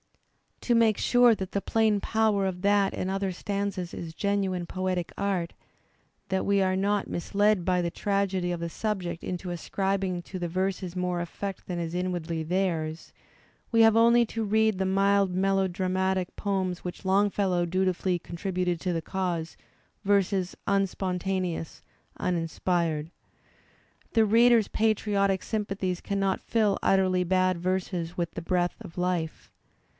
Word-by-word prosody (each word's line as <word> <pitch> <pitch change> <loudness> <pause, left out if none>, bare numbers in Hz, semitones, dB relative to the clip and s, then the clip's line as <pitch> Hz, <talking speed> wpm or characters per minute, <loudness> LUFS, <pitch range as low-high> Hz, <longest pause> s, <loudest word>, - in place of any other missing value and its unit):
To 240 - +1
make 225 -2 +4
sure 245 -1 +5
that 190 -3 -5
the 200 - -1
plain 220 -1 +2
power 215 -2 +1
of 180 -1 -3
that 200 0 +3
and 185 - -3
other 195 0 -1
stanzas 200 -1 -3
is 165 -2 -6
genuine 195 -1 -1
poetic 185 -2 -2
art, 190 -4 -1 0.8
that 190 0 0
we 200 0 +3
are 185 0 +2
not 200 +1 0
misled 205 +1 +1
by 180 -1 +2
the 170 - -1
tragedy 195 -3 0
of 175 - -3
the 170 0 -3
subject 180 -3 -3
into 180 0 -4
ascribing 190 +1 -1
to 185 +1 -7
the 175 - -2
verses 185 0 -2
more 180 -1 -1
effect 190 +3 -5
than 180 - -3
is 165 -1 -3
inwardly 175 -3 -2
theirs, 165 -2 -2 0.6
we 230 -1 +4
have 225 -1 +6
only 235 +1 +5
to 225 +1 -3
read 220 0 +2
the 190 - 0
mild 195 0 +2
melodramatic 190 -1 0
poems 190 -3 -2
which 180 +2 -7
Longfellow 190 -2 +2
dutifully 185 0 0
contributed 180 0 -2
to 180 -2 -1
the 165 - -1
cause, 175 -4 -3 0.5
verses 195 -2 +1
unspontaneous, 185 -3 -1 0.4
uninspired. 165 -2 -1 1.0
The 225 -2 +5
reader's 230 0 +5
patriotic 205 -3 +1
sympathies 195 -4 -2
cannot 195 -1 -1
fill 215 -4 +1
utterly 185 -1 +3
bad 185 0 +2
verses 180 -1 -2
with 170 -1 -1
the 170 - -6
breath 175 0 0
of 185 -6 -11
life. 180 -3 -2
190 Hz, 140 wpm, -27 LUFS, 180-200 Hz, 1.0 s, have